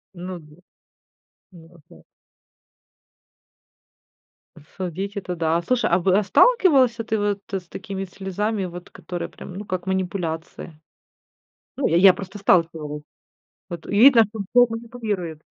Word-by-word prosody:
Ну, 180 0 -7
д 150 0 -18 1.0
ну, 165 0 -16
опять. 155 - -19 2.7
Судить- 190 +3 -4
это 180 -2 -4
да, 165 0 +1 0.3
а 175 +2 +3
в 180 - -7
а 200 +3 +4
сталкивался 265 - +4
ты 220 0 -1
вот 205 -1 -1
с 185 -3 -4
такими 195 -3 -6
слезами, 195 +2 -3
вот 175 0 -9
которые 175 -1 -6
прям, 185 - -11
ну, 205 +1 -7
как 185 -1 -4
манипуляция? 175 -4 -4 1.0
Ну, 275 - 0
я 165 - +2
я 185 -1 +7
просто 195 +2 -8
сталкивалась, 160 -6 +1 0.7
вот 170 -2 -7
видно, 230 +3 +6
что 215 0 -10
тобой 245 -1 +6
манипулируют. 210 - -5
190 Hz, 125 wpm, -22 LUFS, 170-210 Hz, 2.7 s, я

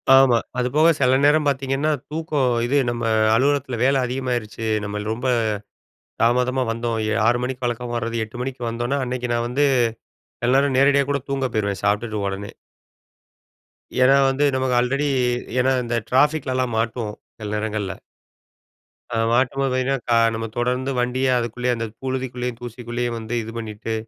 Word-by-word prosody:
ஆமா. 135 -3 +6 0.2
அதுபோக, 140 +6 +3
செல 130 -1 +4
நேரம் 150 +1 +4
பாத்தீங்கன்னா, 135 +2 0 0.2
தூக்கம். 150 -4 0 0.2
இது 135 +4 +1
நம்ம, 120 0 -3 0.3
அலுவலகத்தில 130 0 +1
வேல 135 +1 +3
அதிகமாயிருச்சு, 125 -3 -3 0.2
நம்மல் 105 +1 -4
ரொம்ப 120 +3 -3 1.0
தாமதமா 125 +2 +2
வந்தோம். 115 0 -2
எ - - +1
6 120 +1 +4
மணிக்கு 125 0 -3
வழக்கமா 120 0 -3
வர்ரது. 115 0 -2
8 110 +3 -10
மணிக்கு 130 0 -5
வந்தோனா, 120 +4 -1
அன்னைக்கு 125 -1 -3
நான் 120 0 0
வந்து, 135 +4 +1 0.8
சில 125 +2 +3
நேரம் 140 -1 +2
நேரடியா 140 +1 +4
கூட 140 0 0
தூங்கப் 135 -3 -1
போயிருவேன். 100 -2 -1
சாப்பிட்டுட்டு 105 0 0
உடனே. 100 +1 -5 1.5
ஏன்னா 130 +2 +6
வந்து, 135 +2 +1
நமக்கு 130 -1 +1
ஆல்ரெடி 140 +4 0 0.5
ஏன்னா, 130 +1 +2
இந்த 120 0 -1
டிராபிக்லலாம் 130 -3 +1
மாட்டுவோம். 110 -1 -2 0.2
சில 105 -1 -5
நேரங்கள்ல. 105 -2 -2 1.2
அ, - - -2 0.2
மாட்டும்போ 130 +3 +2
பாத்தீங்னா, 130 +1 +1
க - - +1 0.2
நம்ம 115 0 -3
தொடர்ந்து 125 +2 0
வண்டிய 125 +2 0
அதுக்குள்ளயே, 125 +1 -2
அந்த 115 0 -3 0.2
புழுதிக்குள்ளயும், 125 -2 -3
தூசிக்குள்ளயே 120 0 -4
வந்து, 115 +1 -6
இது 110 - -7
பண்ணிட்டு, 110 0 -5
125 Hz, 145 wpm, -22 LUFS, 115-135 Hz, 1.5 s, ஆமா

